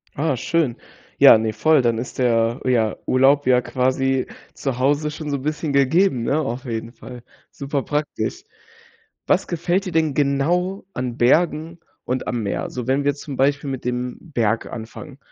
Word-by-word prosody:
Ah, 145 -3 0
schön. 155 -3 0 0.4
Ja, - - +8
ne, 110 -1 -1
voll. 150 +6 +3
Dann 115 -2 +1
ist 120 +3 -6
der, 115 0 +2
ja, 115 -4 +2
Urlaub 135 +2 +3
ja 125 -1 +5
quasi 130 +1 0 0.3
zu 135 -3 -3
Hause 145 +3 +1
schon 150 -1 -6
so 140 - -1
bisschen 150 +1 -3
gegeben, 140 -1 +3
ne, 145 +6 +1
auf 130 -3 -4
jeden 115 -1 -4
Fall. 120 0 -11 0.3
Superpraktisch. 145 +1 -3 0.8
Was - - +2
gefällt 175 +3 -1
dir 180 - -4
denn 160 -2 +1
genau 170 +7 0
an 125 -1 -4
Bergen 160 +5 +2 0.3
und 125 +1 -2
am 120 -3 -2
Meer? 100 - -2
Also, 125 -1 -6
wenn 135 +2 +1
wir 145 -1 +2
zum 140 -2 -8
Beispiel 140 +1 +1
mit 130 -2 -5
dem 125 0 -3
Berg 115 -9 -1
anfangen. 125 +5 -9
135 Hz, 165 wpm, -21 LUFS, 125-150 Hz, 0.8 s, Ja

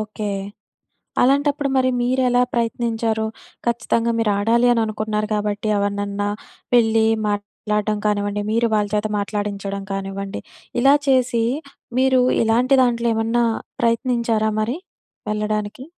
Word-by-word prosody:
Okay. 215 -1 -4 0.9
అలాంటప్పుడు 285 +2 +2
మరి 255 0 +3
మీరెలా 250 0 +2
ప్రయత్నించారు? 230 -1 0 0.4
ఖచ్చితంగా 235 0 +1
మీరాడాలి 225 +2 +2
అననుకున్నారు 215 -1 -1
కాబట్టి 210 0 -2
ఎవరినన్నా 205 0 -1 0.5
వెళ్లి 225 -2 +4 0.2
మాట్లాడడం 210 +1 -2
కానివ్వండి, 205 0 0
మీరు 230 +1 +2
వాళ్ళ 210 -1 +1
చేత 210 0 +1
మాట్లాడించడం 200 -1 -3
కానివ్వండి, 195 0 -4 0.4
ఇలా 275 +2 +6
చేసి 255 -3 +3 0.6
మీరు 260 -1 +4 0.2
ఇలాంటి 245 +4 +3
దాంట్లో 235 -1 +1
ఏమన్నా 225 +2 +1 0.4
ప్రయత్నించారా 230 -2 +1
మరి 235 +8 -1 0.5
వెళ్ళడానికి? 210 +2 -2
220 Hz, 100 wpm, -21 LUFS, 210-240 Hz, 0.9 s, ఇలా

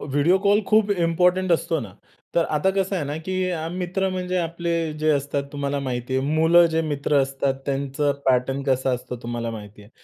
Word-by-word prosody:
Video 145 +6 +2
call 200 +1 +3
खूप 215 -1 +3
important 180 0 +2
असतो 165 -1 0
ना. 105 -7 -8 0.4
तर 170 - +3
आता 155 +5 +1
कसं 195 0 -1
आहे 160 - -2
ना 145 +2 -4
की, 185 - -2 0.4
मित्र 185 +2 -1
म्हणजे 185 0 -2
आपले 170 -1 -2
जे 155 +1 +2
असतात, 140 -1 0
तुम्हाला 140 0 -2
माहिती 130 -1 -3
आहे, 130 - +1
मुलं 160 +3 +5
जे 160 - +2
मित्र 145 -1 -1
असतात 135 0 -1
त्यांचा 140 +1 -1 0.2
पॅटर्न 130 +1 +1
कसा 130 -1 +1
असतो, 125 0 -4
तुम्हाला 120 0 -3
माहिती 105 -2 -10
आहे. 105 - -18
150 Hz, 185 wpm, -23 LUFS, 135-175 Hz, 0.4 s, मुलं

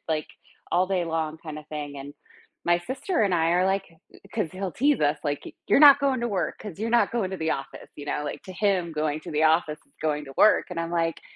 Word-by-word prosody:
like, 155 -1 -1 0.5
all 185 +1 +3
day 185 -3 0
long 160 -1 -2
kinda 155 -1 -7
thing 145 -2 -6
and 140 +1 -8 0.5
my 175 0 +3
sister 275 +8 -2
and 200 -3 +2
I 165 -1 +2
are, 180 +2 +3
like 195 0 +1 0.5
'cause 215 -7 0
he'll 185 -1 -4
tease 285 - +2
us, 150 0 +2
like, 145 -2 -2
"Y - - -8 0.2
you're - - +5
not 285 -1 +9
going 270 -3 +1
to 240 - 0
work 190 -4 -2
'cause 200 -5 -9
you're 225 +1 -1
not 235 0 +3
going 220 -6 -1
to 190 - -4
the 160 -2 -1
office," 135 0 -7
you 145 - -8
know, 150 - -2
like, 145 - -5
to 185 - -8
him, 185 -3 0
going 155 0 -1
to - - -9
the 155 +1 +1
office 155 -1 +2
is - - -34
going 150 -1 -1
to 135 - -11
work 215 - +5
and 170 -2 -3
I'm 165 0 -3
like, 165 -1 -1
170 Hz, 250 wpm, -26 LUFS, 155-195 Hz, 0.5 s, not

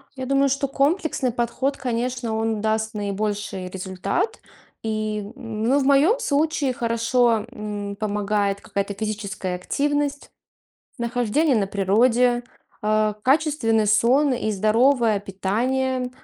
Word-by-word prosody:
Я 260 -1 -5
думаю, 275 +1 +3
что 275 +1 0
комплексный 280 -1 0
подход, 245 +4 -1
конечно, 245 -2 -2
он 220 -1 -1
даст 220 +1 0
наибольший 205 -2 -3
результат. 190 - -2 0.4
И, 215 -1 -2
ну, 230 +1 0
в - - 0
моем 290 - +4
случае 300 - +1
хорошо, 230 -1 +1
м, 205 -3 -5
помогает 205 -1 -1
какая-то 200 0 -3
физическая 200 -3 -4
активность, 290 +8 -1 0.7
нахождение 245 +4 +1
на 205 -3 +1
природе, 235 +5 +2 0.4
э, 215 0 +2
качественный 260 -5 +2
сон 250 +7 +4
и 235 -3 -1
здоровое 220 +2 +3
питание, 250 +7 -1
230 Hz, 110 wpm, -23 LUFS, 210-265 Hz, 0.7 s, моем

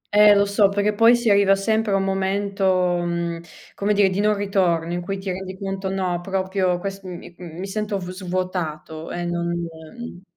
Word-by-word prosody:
Eh 210 0 +8
lo 200 0 +4
so, 200 0 +3
perché 205 +1 +1
poi 230 +3 +6
si 240 -3 +1
arriva 200 -1 +5
sempre 220 +2 0
a - - +4
un 195 - +1
momento, 195 +1 0 0.3
mhmm, 170 -1 -2 0.3
come 205 +1 0
dire, 200 -1 +4
di 185 - -2
non 210 +1 +3
ritorno, 180 -5 0
in 175 - -2
cui 195 +2 -4
ti 190 -1 -4
rendi 190 0 -6
conto, 195 0 -4
no, 185 -2 -1
proprio 190 -1 0
quest 195 +2 -5
mi, 180 -1 -9
mhmm, 170 -2 -10
mi 185 - -4
sento 210 +1 -2
v 180 -1 -6
svuotato 175 -4 -4
e 175 0 -4
non, 170 0 -2
ehm 170 +5 -8
190 Hz, 195 wpm, -22 LUFS, 175-200 Hz, 0.3 s, Eh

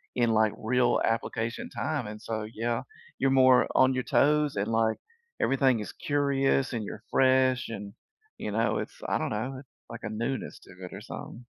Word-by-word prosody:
in, 120 -2 +2
like, 110 -1 +3
real 120 +2 +2
application 115 0 -2
time, 140 -4 -2
and 105 0 -7
so, 110 0 -4
yeah, 115 +1 -1 0.4
you're 135 - +3
more 130 -1 +5
on 130 0 +5
your 130 -1 -1
toes 150 0 +3
and, 100 +1 -1
like, 110 -1 +2 0.4
everything 135 -3 +3
is 105 - -5
curious 140 -3 +1
and 115 - -2
you're 105 +2 -7
fresh 130 -1 +3
and, 100 -3 -7 0.4
you 105 - -4
know, 110 0 +1
it's, - - -7
I - - +1
don't - - -1
know, 125 +5 -3 0.3
like 115 0 -8
a 105 - -3
newness 120 +5 -3
to - - -16 0.2
or 95 +1 -8
something 120 +2 -9
120 Hz, 175 wpm, -28 LUFS, 110-130 Hz, 0.4 s, more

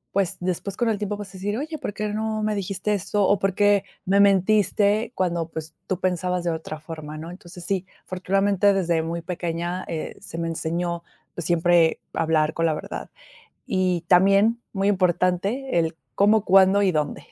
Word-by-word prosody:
Pues 195 -3 +1
después, 185 +2 -3
con 240 -2 +1
el 210 - 0
tiempo, 210 0 -3
vas 205 -2 -7
a - - -16
decir: 200 +3 -3
"Oye, 310 +3 -4
¿por - - -4
qué 210 0 -2
no 215 0 -2
me 215 0 +1
dijiste 195 +1 -2
esto, 205 0 0
o 200 - +3
por 195 -1 0
qué 205 -1 +4 0.2
me 195 +2 +3
mentiste 205 +2 +3
cuando, 170 -3 -1
pues, 160 0 -7
tú 185 - -2
pensabas 180 -1 -1
de 170 - 0
otra 160 -1 -5
forma, 155 -1 -8
¿no?" 165 +2 -7
Entonces 180 -1 -11
sí, 190 -1 -1 0.2
afortunadamente, 195 +2 +2
desde 170 -4 +1
muy 165 +1 -4
pequeña, 175 0 -3
eh, 160 -2 -4
se 165 - -8
me 165 - -2
enseñó 170 +1 -2 0.4
siempre 170 -1 +3
a - - -1
hablar 160 -1 +2
con 165 0 +1
la 155 - +1
verdad. - - -6 0.6
Y 185 -2 +1
también 200 +6 +4
muy 195 0 0
importante 185 +6 +1
el 160 -1 -1 0.2
cómo, 210 +1 +4
cuándo 195 +1 +5
y 195 - +3
dónde. 150 -3 -2
185 Hz, 185 wpm, -24 LUFS, 170-200 Hz, 0.6 s, cuándo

